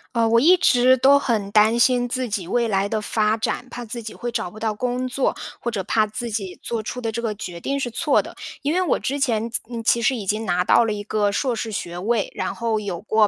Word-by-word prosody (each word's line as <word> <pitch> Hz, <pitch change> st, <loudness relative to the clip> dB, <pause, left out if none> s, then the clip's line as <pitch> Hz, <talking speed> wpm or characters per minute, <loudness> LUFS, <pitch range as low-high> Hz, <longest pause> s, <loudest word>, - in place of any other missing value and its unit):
呃， 230 Hz, -1 st, +3 dB
我 230 Hz, +1 st, +5 dB
一 335 Hz, +9 st, +6 dB
直 255 Hz, -6 st, +4 dB
都 275 Hz, +2 st, +5 dB
很 215 Hz, -7 st, -1 dB
担 215 Hz, +2 st, +4 dB
心 245 Hz, 0 st, +3 dB
自 255 Hz, 0 st, -3 dB
己 200 Hz, -4 st, -3 dB
未 235 Hz, +3 st, +1 dB
来 195 Hz, -1 st, +1 dB
的 215 Hz, +1 st, -2 dB
发 215 Hz, 0 st, +1 dB
展， 230 Hz, +3 st, -3 dB
怕 245 Hz, -1 st, -7 dB
自 235 Hz, +1 st, -6 dB
己 220 Hz, -1 st, -7 dB
会 240 Hz, -, -5 dB
找 180 Hz, -, -2 dB
不 210 Hz, -, -14 dB
到 220 Hz, 0 st, -1 dB
工 250 Hz, +3 st, -2 dB
作， 265 Hz, +2 st, 0 dB, 0.2 s
或 235 Hz, -, -2 dB
者 205 Hz, -5 st, -3 dB
怕 215 Hz, +3 st, +2 dB
自 230 Hz, +3 st, -5 dB
己 195 Hz, -4 st, -4 dB
做 230 Hz, -2 st, -2 dB
出 250 Hz, +3 st, -5 dB
的 225 Hz, -2 st, -2 dB
这 235 Hz, +1 st, -3 dB
个 220 Hz, -3 st, -2 dB
决 180 Hz, -5 st, -7 dB
定 275 Hz, +10 st, -2 dB
是 255 Hz, -3 st, -3 dB
错 295 Hz, +5 st, +2 dB
的。 -, -, -10 dB, 0.3 s
因 290 Hz, -, 0 dB
为 365 Hz, -, +2 dB
我 360 Hz, -, +2 dB
之 280 Hz, +2 st, -3 dB
前， 230 Hz, -3 st, 0 dB
其 -, -, -1 dB
嗯， 230 Hz, -1 st, -5 dB
其 235 Hz, +1 st, +3 dB
实 260 Hz, +4 st, +2 dB
已 215 Hz, -5 st, -5 dB
经 215 Hz, +3 st, -1 dB
拿 180 Hz, -1 st, +1 dB
到 230 Hz, -, +4 dB
了 215 Hz, -, -1 dB
一 205 Hz, 0 st, -5 dB
个 205 Hz, -1 st, 0 dB
硕 255 Hz, +2 st, 0 dB
士 225 Hz, 0 st, -3 dB
学 175 Hz, -4 st, -5 dB
位， 215 Hz, +3 st, 0 dB
然 -, -, -3 dB
后 230 Hz, -2 st, -1 dB
有 195 Hz, -5 st, -5 dB
过 215 Hz, 0 st, +3 dB
225 Hz, 285 characters per minute, -22 LUFS, 210-245 Hz, 0.3 s, 一